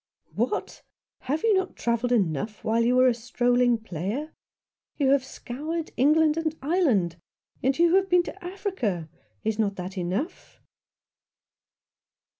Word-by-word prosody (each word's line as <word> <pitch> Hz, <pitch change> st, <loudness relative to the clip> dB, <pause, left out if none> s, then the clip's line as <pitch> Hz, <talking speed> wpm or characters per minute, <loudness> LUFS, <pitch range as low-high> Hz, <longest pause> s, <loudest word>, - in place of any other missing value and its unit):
" -, -, -56 dB
What! -, -, -2 dB, 0.4 s
Have 295 Hz, +5 st, -2 dB
you 450 Hz, -, +4 dB
not 380 Hz, -1 st, 0 dB
travelled 235 Hz, +1 st, 0 dB
enough 210 Hz, -, 0 dB
while 230 Hz, +1 st, +2 dB
you 245 Hz, +2 st, +3 dB
were 255 Hz, 0 st, +6 dB
a 250 Hz, -, +4 dB
strolling 245 Hz, 0 st, +2 dB
player? 220 Hz, -, -4 dB, 0.6 s
You 275 Hz, -3 st, +3 dB
have 280 Hz, -1 st, +4 dB
scoured 305 Hz, +7 st, -5 dB
England 305 Hz, +3 st, +4 dB
and 320 Hz, -1 st, -1 dB
Ireland, 260 Hz, -, +1 dB, 0.4 s
and 265 Hz, +1 st, +1 dB
you 340 Hz, 0 st, +4 dB
have 385 Hz, 0 st, +3 dB
been 355 Hz, -1 st, +5 dB
to 390 Hz, +2 st, -9 dB
Africa. 350 Hz, -, -3 dB, 0.4 s
Is 220 Hz, 0 st, -1 dB
not 200 Hz, -2 st, +1 dB
that 185 Hz, +1 st, -5 dB
enough 190 Hz, -, -4 dB
250 Hz, 140 wpm, -26 LUFS, 220-320 Hz, 0.6 s, were